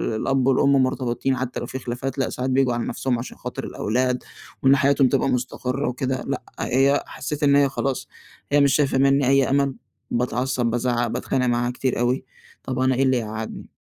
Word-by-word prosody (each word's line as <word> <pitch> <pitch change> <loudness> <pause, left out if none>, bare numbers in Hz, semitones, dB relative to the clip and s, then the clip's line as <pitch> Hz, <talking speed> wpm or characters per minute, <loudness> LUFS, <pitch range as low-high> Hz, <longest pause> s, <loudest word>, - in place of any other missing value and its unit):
الأب 135 +3 +1
والأم 140 +1 +4
مرتبِطين 130 0 -1
حتى 125 0 -3
لو - - -4
في 130 - -6
خلافات، 125 +2 -4
لأ 135 - 0
ساعات 130 +1 -3
بييجوا 130 -1 +2
على 120 0 -2
نَفْسهم 125 -3 -1
عشان 120 - -8
خاطر - - -6
الأولاد 125 +3 -1 0.4
وإن 135 +1 +6
حياتهم 140 0 +3
تبقى - - +1
مستقرِّة 125 +2 -2
وكده. 130 +1 -2
لأ 140 -1 -2 0.2
هي 135 +3 +2
حسّيت 150 +2 -5
إن 140 -1 +5
هي 140 -1 +4
خلاص، 135 0 -2 0.4
هي 145 0 +5
مش 140 -1 +4
شايفة 140 -3 +2
منّي 135 0 +3
أي 135 0 +4
أمَل. 140 -1 +1 0.4
باتعصّب، 125 +1 0
بازعّق، 120 +1 0
باتخانق 125 +2 -1
معاها 120 0 +1
كتير 125 0 -2
أوي. 125 +2 0 0.4
طَب 130 -1 -3
أنا 130 0 +2
إيه 135 - +2
اللي 130 -1 +3
يقعّدني. 110 -1 -6
130 Hz, 185 wpm, -23 LUFS, 125-135 Hz, 0.4 s, وإن